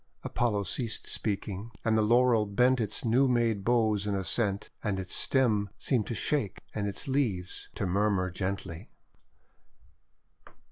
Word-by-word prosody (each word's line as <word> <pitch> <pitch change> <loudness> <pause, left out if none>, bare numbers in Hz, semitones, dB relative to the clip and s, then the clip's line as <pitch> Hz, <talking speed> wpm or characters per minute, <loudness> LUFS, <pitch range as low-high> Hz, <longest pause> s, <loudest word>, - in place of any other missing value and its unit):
Apollo 105 -4 0
ceased 115 +1 -2
speaking, 100 0 -3 0.2
and 110 -1 +3
the 110 - +3
Laurel 115 0 +4
bent 125 +5 +3
its 105 +2 -2
new 125 +4 +4
made 115 -5 +1
boughs 110 -3 +2
in 100 - 0
assent, 100 +1 0
and 100 -3 -1
its 90 -2 -4
stem 110 -7 +2
seemed 120 -6 0
to 120 - -3
shake 140 - -1
and 105 -1 -2
its 100 +8 -4
leaves 115 -10 -1
to - - -2
murmur 95 0 +1
(gently. 95 0 -4
105 Hz, 140 wpm, -29 LUFS, 100-120 Hz, 0.2 s, Laurel